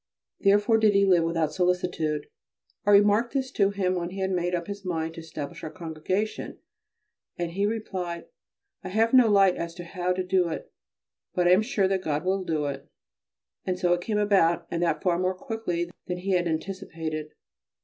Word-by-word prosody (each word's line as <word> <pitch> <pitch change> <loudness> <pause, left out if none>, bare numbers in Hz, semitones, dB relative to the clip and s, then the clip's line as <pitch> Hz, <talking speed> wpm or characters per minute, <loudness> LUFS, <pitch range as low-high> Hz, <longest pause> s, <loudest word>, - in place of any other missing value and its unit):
Therefore 205 +3 +4
did 215 -2 +4
he 200 0 +5
live 180 -3 +4
without 165 -2 0
solicitude. 180 -4 0 0.6
I - - +5
remarked 205 +3 +5
this 265 -1 -1
to 200 -6 +2
him 195 -2 0
when 175 -1 -2
he 190 +2 -7
had 190 0 0
made 180 -1 0
up 170 -1 -3
his 200 +1 -7
mind 165 -3 -2
to 165 - -9
establish 155 -3 -7
our 155 - -4
Congregation, 170 +6 -3 0.8
and 175 -1 -2
he 200 +4 0
replied: 185 -6 -4 0.6
"I 185 - -5
have 225 +5 +2
no 250 -3 +7
light 195 -3 +5
as 170 0 -5
to 175 - -7
how 180 +1 -2
to 185 0 -2
do 180 -1 +2
it, 160 - -6 0.6
but 180 -2 +2
I - - +5
am 185 +3 +6
sure 215 -4 +1
that 190 -1 0
God 155 -1 -2
will 190 +1 +1
do 155 -4 -1
it"; 140 -1 -5 0.7
and 185 -1 -2
so 180 -1 +2
it 175 - -1
came 210 +3 -1
about, 190 -5 +3
and 170 - -1
that 165 -3 0
far 175 -2 +2
more 185 0 0
quickly 185 -7 -3 0.2
than 180 - -2
he 190 +1 0
anticipated. 160 -3 -3
180 Hz, 190 wpm, -26 LUFS, 170-200 Hz, 0.8 s, no